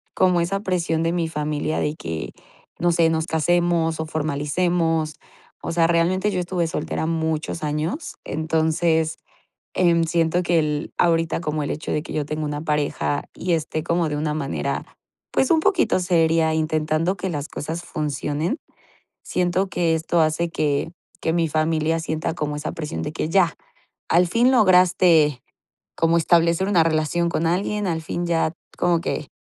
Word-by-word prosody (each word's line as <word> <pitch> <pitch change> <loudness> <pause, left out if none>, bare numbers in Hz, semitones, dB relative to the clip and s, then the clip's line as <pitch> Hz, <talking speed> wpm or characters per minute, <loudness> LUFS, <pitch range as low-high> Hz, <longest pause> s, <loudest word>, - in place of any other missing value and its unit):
como 180 -2 +3
esa 195 +4 -1
presión 175 -4 0
de 165 - +1
mi 170 -2 0
familia 150 0 -2
de 150 +1 -1
que, 80 - -5 0.5
no 175 +1 +2
sé, 165 -1 +3
nos 160 -1 0
casemos 165 0 +1
o 160 - -1
formalicemos. 155 +1 0 0.5
O - - -4
sea, 165 -1 +3
realmente 175 +4 +2
yo 185 - -1
estuve 175 -1 -1
soltera 160 - -3
muchos 160 -1 -2
años, 155 - -3
entonces, 160 +1 0 0.6
em, 170 -2 +3
siento 170 +1 +1
que 170 -1 +2
el 150 -1 -2
ahorita 165 -1 +2
como 150 -2 -2
el 145 - -2
hecho 155 - -4
de 150 - -1
que - - -8
yo 150 -2 -1
tengo 155 +1 -3
una 145 0 -3
pareja, 150 -1 -1
y 180 0 -2
esté 160 -1 -1
como 170 0 +1
de 150 - -2
una 150 0 -1
manera, 140 -3 -2 0.5
pues 265 - +2
un 320 -1 +4
poquito 395 - +2
seria 165 -3 +2
intentando 155 +3 0
que 185 +1 -3
las 145 -2 -4
cosas 160 +3 -5
funcionen, 150 - -2 0.7
siento 180 +2 0
que 170 -3 +1
esto 165 +1 0
hace 160 +2 +1
que 150 -1 0 0.3
que 160 - 0
mi 170 -1 +2
familia 155 +1 +1
sienta 160 0 -2
como 150 -3 -3
esa 150 +1 -4
presión 155 -1 -5
de 150 - -4
que 155 - -2
ya, 175 -2 +3 0.5
al 175 +2 +4
fin 235 +7 +3
lograste 180 - +4 0.5
como 165 0 +3
establecer 170 +2 +3
una 180 -5 +4
relación 165 +2 +1
con 165 0 0
alguien, 200 +4 0
al 160 -2 -2
fin 175 +2 -3
ya 165 -2 +1 0.3
como 175 -1 +2
que 150 - -3
165 Hz, 165 wpm, -22 LUFS, 155-175 Hz, 0.7 s, un